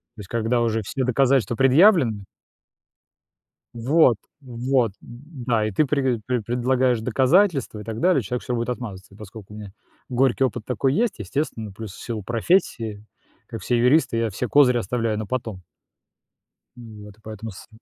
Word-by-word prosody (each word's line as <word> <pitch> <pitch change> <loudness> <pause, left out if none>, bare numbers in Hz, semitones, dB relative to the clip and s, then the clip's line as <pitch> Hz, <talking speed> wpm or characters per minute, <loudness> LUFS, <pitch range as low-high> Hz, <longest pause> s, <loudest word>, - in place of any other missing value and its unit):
То - - -15
есть 95 - -12
когда 120 +1 0
уже 115 -1 0
все 130 +7 -3
доказательства 130 -1 +2
предъявлены 135 - +4 1.5
Вот 125 +1 +3 0.2
вот, 125 -2 -1
да. 120 -3 -3
И - - -3
ты 150 +10 +2
прег 130 -5 0
пре 125 -2 -1
предлагаешь 125 +1 +1
доказательства 135 - +2
и - - -8
так 110 +1 -6
далее, 180 -1 +3
а - - -2
человек 120 +4 -4
всё 125 - -2
будет 120 0 -2
отмазываться. 100 -6 -7
Поскоку 105 0 -12
у - - -9
меня 100 -2 -10 0.4
горький 130 +1 +2
опыт 120 -3 -1
такой 130 +1 0
есть, 225 - 0
естественно, 110 0 -4
плюс 105 +1 -8
в - - -12
силу 115 -3 -4
профессии, 115 - 0 0.4
как 115 - -7
все 120 - 0
юристы, 125 +1 +3
я 115 -1 0
все 115 +5 -4
козыри 125 0 +4
оставляю 115 0 -1
на 110 - -4
потом. 110 -5 -4 1.1
Вот 105 -4 -12
и - - -27
поэтому 110 0 -8
с 95 - -13
120 Hz, 165 wpm, -23 LUFS, 110-130 Hz, 1.5 s, предъявлены